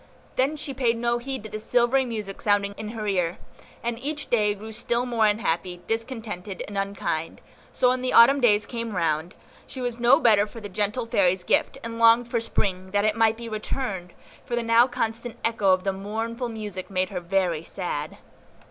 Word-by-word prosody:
Then 275 +4 +1
she 285 -2 -4
paid 240 -3 +1
no 240 +1 0
heed 265 -1 -4
to 215 - -8
the 215 - -4
silvery 245 +4 +2
music 215 -5 -5
sounding 200 -1 +2
in 215 - -6
her 220 -1 -5
ear, 180 -4 0 0.5
and 235 0 -2
each 295 +2 -3
day 210 -3 +3
grew 215 +2 -9
still 235 +2 -1
more 230 -3 +2
unhappy, 180 -4 -1
discontented, 225 -5 -4
and 205 - -8
unkind; 195 -5 -2 0.3
so, 250 - +3
when 255 0 0
the 255 - -1
Autumn 270 +4 +7
days 210 -3 +4
came 230 -3 -4
round, 165 0 -1 0.3
she 260 - -8
was 245 -1 -3
no 240 +5 +6
better 215 -7 +4
for 230 - -10
the 205 -2 -7
gentle 210 +5 -1
Fairy's 190 -6 +2
gift, - - +1
and 230 0 -5
longed 230 +1 +6
for 235 - 0
Spring, 190 -4 -2
that 205 +2 +1
it 215 -1 +2
might 225 -1 +3
be 235 0 -7
returned; 210 -4 -4 0.3
for 240 - -3
now 230 +2 +5
the - - -18
constant 230 -1 -3
echo 225 -4 +1
of 185 0 +2
the 195 - 0
mournful 225 +5 -4
music 210 -5 -6
made 185 -1 0
her 185 - -4
very 175 -3 0
sad. 160 -5 -4
220 Hz, 195 wpm, -25 LUFS, 195-235 Hz, 0.5 s, Autumn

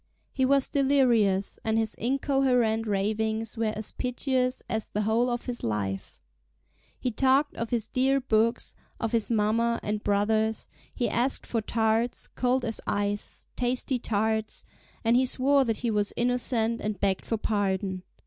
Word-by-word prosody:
He 260 - +1
was 275 0 +3
delirious, 240 -9 +2
and 220 0 +1
his 225 -1 +1
incoherent 250 -3 +1
ravings 220 +2 -1
were 225 -1 0
as 215 0 -2
piteous 255 0 0
as 220 -1 -2
the 210 - -2
whole 225 +4 +2
of 240 0 -3
his 245 -2 -4
life. 100 - -3 0.8
He 250 - -1
talked 270 +5 +2
of 230 0 -4
his 235 -3 -1
dear 265 +4 +1
books, 230 -2 0 0.2
of 225 - -2
his 230 -2 +1
mamma 230 +1 +1
and 210 0 -2
brothers; 215 +2 +1 0.2
he 245 - -1
asked 250 +3 -1
for 230 - -1
tarts, 225 +2 0
cold 255 0 0
as 225 - -3
ice, 205 0 -2
tasty 250 +1 0
tarts; 220 0 -1 0.4
and 230 +1 +3
he 255 +1 +3
swore 275 +2 +3
that 225 -2 -1
he 235 - +1
was 205 -1 0
innocent, 235 -1 +1
and 210 -1 -3
begged 195 -2 0
for 225 - -2
pardon. 195 -3 -1
225 Hz, 155 wpm, -27 LUFS, 215-250 Hz, 0.8 s, was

